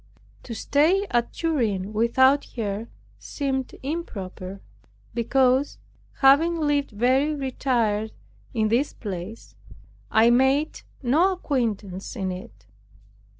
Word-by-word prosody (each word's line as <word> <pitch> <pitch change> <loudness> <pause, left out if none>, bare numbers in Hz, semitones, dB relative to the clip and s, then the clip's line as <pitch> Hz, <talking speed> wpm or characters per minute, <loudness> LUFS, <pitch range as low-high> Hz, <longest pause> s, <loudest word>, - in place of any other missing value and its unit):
To 230 - -7
stay 325 - +2
at 240 -1 +1
Turin 220 - -1
without 260 +5 +3
her 215 -1 -3 0.3
seemed 265 -2 -3
improper, 200 - -5 0.5
because, 260 +3 +2 0.4
having 300 +5 +5
lived 290 -2 +1
very 260 +7 +1
retired 240 -6 -1 0.4
in 215 -1 0
this 250 +6 +1
place, 200 +1 -7 0.6
I 225 +2 +5
made 265 +5 +2 0.2
no 320 +10 +3
acquaintance 220 - -3
in 190 -2 -2
it. 180 - -10
250 Hz, 100 wpm, -24 LUFS, 215-285 Hz, 0.6 s, having